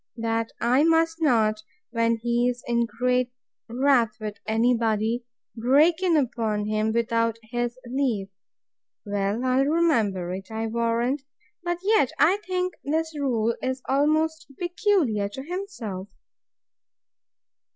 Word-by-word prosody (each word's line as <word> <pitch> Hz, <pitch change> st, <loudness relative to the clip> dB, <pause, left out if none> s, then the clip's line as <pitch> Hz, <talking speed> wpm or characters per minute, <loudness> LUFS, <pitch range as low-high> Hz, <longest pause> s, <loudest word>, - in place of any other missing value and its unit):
That 230 Hz, 0 st, -1 dB
I 250 Hz, +5 st, +3 dB
must 330 Hz, 0 st, +2 dB
not, 220 Hz, -7 st, +2 dB, 0.3 s
when 230 Hz, -1 st, +1 dB
he 240 Hz, +2 st, +1 dB
is 245 Hz, 0 st, -5 dB
in 235 Hz, -1 st, +1 dB
great 250 Hz, +1 st, 0 dB, 0.4 s
wrath 245 Hz, -3 st, +2 dB
with 210 Hz, -2 st, -6 dB
any 230 Hz, +3 st, +3 dB
body, 225 Hz, +1 st, 0 dB, 0.3 s
break 290 Hz, +9 st, +4 dB
in 350 Hz, -4 st, +3 dB
upon 225 Hz, -6 st, 0 dB
him 215 Hz, +1 st, 0 dB
without 230 Hz, 0 st, +1 dB
his 240 Hz, 0 st, -2 dB
leave. 240 Hz, -6 st, -1 dB, 0.8 s
Well, 205 Hz, +4 st, -1 dB
I'll 260 Hz, +1 st, +3 dB
remember 225 Hz, -, +1 dB
it, 190 Hz, 0 st, -7 dB
I 220 Hz, 0 st, -3 dB
warrant. 235 Hz, +4 st, 0 dB, 0.4 s
But 345 Hz, 0 st, -2 dB
yet 395 Hz, -, +3 dB
I 365 Hz, +5 st, +4 dB
think 365 Hz, -3 st, -2 dB
this 320 Hz, +2 st, -1 dB
rule 235 Hz, -6 st, 0 dB
is 260 Hz, 0 st, -3 dB
almost 310 Hz, +3 st, +1 dB
peculiar 345 Hz, -, +1 dB
to 265 Hz, +6 st, -7 dB
himself. 280 Hz, -, -5 dB
240 Hz, 125 wpm, -25 LUFS, 225-300 Hz, 0.8 s, break